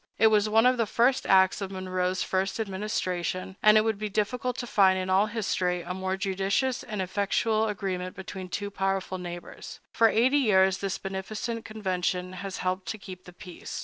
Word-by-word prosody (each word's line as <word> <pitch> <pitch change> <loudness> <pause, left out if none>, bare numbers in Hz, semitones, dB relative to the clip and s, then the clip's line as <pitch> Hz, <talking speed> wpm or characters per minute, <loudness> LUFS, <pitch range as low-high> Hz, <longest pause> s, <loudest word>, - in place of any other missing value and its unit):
It 220 0 +5
was 215 0 +3
one 225 +2 +4
of 250 0 +4
the 230 -2 +1
first 245 +5 +2
acts 190 +1 +4
of 195 - -3
Monroe's 185 -1 -2
first 190 +3 -1
administration, 190 -3 -3
and 215 0 +7
it - - +6
would 220 -2 -1
be 215 0 -3
difficult 235 +5 -1
to 245 - -3
find 190 -5 +4
in 185 0 -2
all 195 +3 +4
history 185 -5 -1
a 180 - -4
more 190 0 -2
judicious 195 +6 0
or 210 -2 -5
effectual 205 +4 0
agreement 190 -3 -3
between 190 0 -7
two 205 +2 -4
powerful 195 -1 -2
neighbors. 175 -1 -8
For 225 -1 +4
eighty 255 +7 +3
years 190 -6 +3
this 195 -1 -2
beneficent 215 +4 -5
convention 185 -4 -2
has 190 +1 -6
helped 185 +1 -1
to 220 - -3
keep 185 -2 -11
the 180 - -11
peace. 180 0 -8
195 Hz, 185 wpm, -27 LUFS, 185-215 Hz, -, and